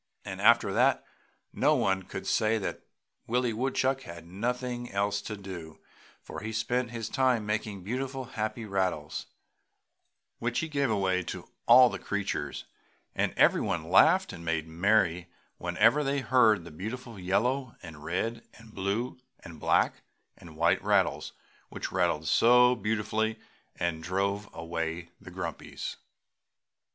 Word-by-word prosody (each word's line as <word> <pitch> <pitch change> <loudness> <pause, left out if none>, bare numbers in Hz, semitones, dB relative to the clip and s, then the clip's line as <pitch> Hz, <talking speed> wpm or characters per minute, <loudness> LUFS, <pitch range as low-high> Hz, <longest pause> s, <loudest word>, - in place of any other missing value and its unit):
And - - -6
after - - +5
that - - +3 0.5
no - - +3
one 95 0 +1
could 95 +1 -7
say 110 +1 +2
that 100 - -4 0.5
Willie 120 0 +1
Woodchuck 130 +2 0
had 85 -5 -10
nothing 120 +6 -3
else 100 +1 0
to 105 - -6
do, 90 -5 -9 0.4
for - - -7
he 110 +1 -5
spent 120 +3 -1
his 115 -2 -5
time 125 -4 +1
making 105 -2 -3
beautiful 130 +5 -3
"happy 110 -1 -4
rattles" 95 -2 -2 1.1
which 120 0 -1
he 160 - 0
gave 140 -4 0
away 95 -3 +1
to - - -6 0.2
all 125 +2 +9
the - - -5
creatures, 95 -8 -3 0.5
and - - 0
everyone - - +2
laughed - - +5
and 85 - -9
made 80 -1 -1
merry 90 0 +2 0.3
whenever 110 +11 +3
they 140 0 0
heard 115 -8 +4
the 85 - -10
beautiful 110 - -7
yellow 120 +8 0
and 80 -4 -10
red 110 +8 -2
and 115 -1 -16
blue 100 +7 -2 0.2
and 80 -2 -11
black - - +2 0.3
and 80 -2 -14
white 85 +1 +2
rattles - - +1 0.4
which - - -5
rattled 85 -4 0
so 125 +7 +6
beautifully 110 0 -1 0.4
and 85 -2 -2
drove 100 +4 -1
away 80 0 -4
the - - -10
grumpies. - - -6
105 Hz, 140 wpm, -29 LUFS, 90-120 Hz, 1.1 s, all